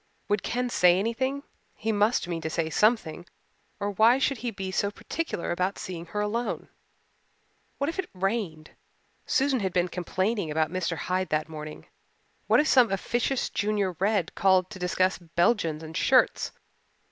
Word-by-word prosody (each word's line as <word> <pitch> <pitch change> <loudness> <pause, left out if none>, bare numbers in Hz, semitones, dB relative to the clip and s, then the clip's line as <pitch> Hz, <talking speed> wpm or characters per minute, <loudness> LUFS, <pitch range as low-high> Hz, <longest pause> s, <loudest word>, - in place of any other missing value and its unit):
Would 205 -1 +2
Ken 250 +1 -1
say 180 -4 +5
anything 260 +7 -1 0.3
he 225 - -2
must 210 -1 +2
mean 170 -2 -3
to 160 - -3
say 160 0 -1
something 175 -5 +1 0.5
or 205 0 -1
why 225 +5 +5
should 270 -2 0
he 245 - -2
be 195 -3 -5
so 200 +1 +1
particular 265 - -4
about 185 +3 -1
seeing 170 -2 -6
her 210 +5 -3
alone? 230 +3 -2 1.1
What 280 - -1
if 335 +4 -3
it 370 - -2
rained 185 -5 -2 0.6
Susan 270 -1 +2
had 190 -4 -2
been 180 0 +1
complaining 185 +2 -1
about 155 +1 0
Mr. 180 -2 -2
Hyde 185 +5 -1
that 155 0 0
morning! 155 -1 -8 0.6
What - - +5
if 305 - +3
some 250 -7 +5
officious 240 +6 0
Junior 205 -2 0
Red 195 -3 +1
called 190 0 +3
to 190 - -8
discuss 185 +1 +1
Belgians 170 -1 +1
and 160 +1 -9
shirts? - - +3
190 Hz, 160 wpm, -27 LUFS, 175-225 Hz, 1.1 s, say